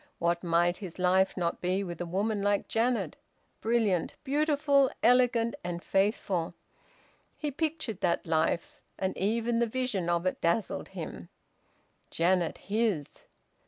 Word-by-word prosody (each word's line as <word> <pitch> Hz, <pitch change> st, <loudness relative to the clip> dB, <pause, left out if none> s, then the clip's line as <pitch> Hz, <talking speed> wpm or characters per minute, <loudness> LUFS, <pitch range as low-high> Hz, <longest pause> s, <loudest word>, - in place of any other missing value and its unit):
What 170 Hz, +1 st, 0 dB
might 175 Hz, +1 st, +2 dB
his 190 Hz, -5 st, -8 dB
life 185 Hz, +1 st, +2 dB
not 170 Hz, -2 st, -1 dB
be 185 Hz, +2 st, 0 dB
with 175 Hz, -2 st, -6 dB
a 175 Hz, -, -3 dB
woman 200 Hz, +4 st, 0 dB
like 205 Hz, 0 st, +1 dB
Janet, 235 Hz, +2 st, 0 dB, 0.4 s
brilliant, 220 Hz, -6 st, +1 dB
beautiful, 285 Hz, -1 st, +3 dB
elegant, 240 Hz, -1 st, +4 dB
and 175 Hz, 0 st, -4 dB
faithful? 195 Hz, -4 st, 0 dB, 0.8 s
He 300 Hz, -2 st, -3 dB
pictured 305 Hz, -, -3 dB
that 170 Hz, -1 st, +1 dB
life, 165 Hz, +1 st, 0 dB, 0.2 s
and 190 Hz, 0 st, -2 dB
even 230 Hz, +4 st, 0 dB
the 235 Hz, -, +2 dB
vision 220 Hz, -7 st, -1 dB
of 170 Hz, +1 st, +1 dB
it 185 Hz, -, -1 dB
dazzled 170 Hz, +6 st, 0 dB
him. -, -, -7 dB, 0.8 s
Janet 175 Hz, 0 st, +1 dB
his! 205 Hz, -8 st, -2 dB
195 Hz, 130 wpm, -29 LUFS, 175-235 Hz, 0.8 s, elegant